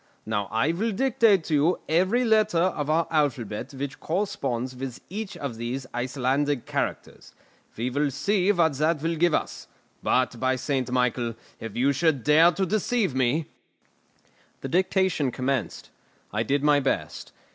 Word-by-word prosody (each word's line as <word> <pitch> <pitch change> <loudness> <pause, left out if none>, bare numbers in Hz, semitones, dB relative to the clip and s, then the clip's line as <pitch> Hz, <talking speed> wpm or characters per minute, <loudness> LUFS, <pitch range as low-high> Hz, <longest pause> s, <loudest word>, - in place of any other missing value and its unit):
"Now 105 -2 -1
I 115 +8 +1
will 215 +7 -1
dictate 220 -5 +3
to 155 - -4
you 150 +5 +3
every 185 +10 +2
letter 215 -4 +3
of 165 -4 0
our 160 +2 +2
alphabet 130 -9 -1
which 140 +1 -5
corresponds 135 - -2
with 130 -1 -6
each 200 0 -5
of 140 -8 -5
these 125 +3 -4
Icelandic 130 +2 -1
characters. - - -4 0.4
We 120 +3 -2
will 145 +2 +1
see 195 +7 +1
what 170 -5 +2
that 155 0 +1
will 165 +1 0
give 170 0 +3
us. - - -4 0.3
But, 125 -2 +1
by 130 +1 +1
St. 130 -1 -2
Michael, 125 -2 0 0.2
if 115 -2 -7
you 130 +4 +3
should 145 -3 +1
dare 160 +5 +6
to 190 +1 -1
deceive 215 - 0
me 130 +5 +1 0.6
" - - -36
The 135 - -5
dictation 185 -4 +1
commenced. 130 -5 -3 0.4
I 105 - 0
did 140 +5 0
my 150 -1 +5
best. 135 - -3
145 Hz, 155 wpm, -25 LUFS, 130-175 Hz, 0.6 s, dare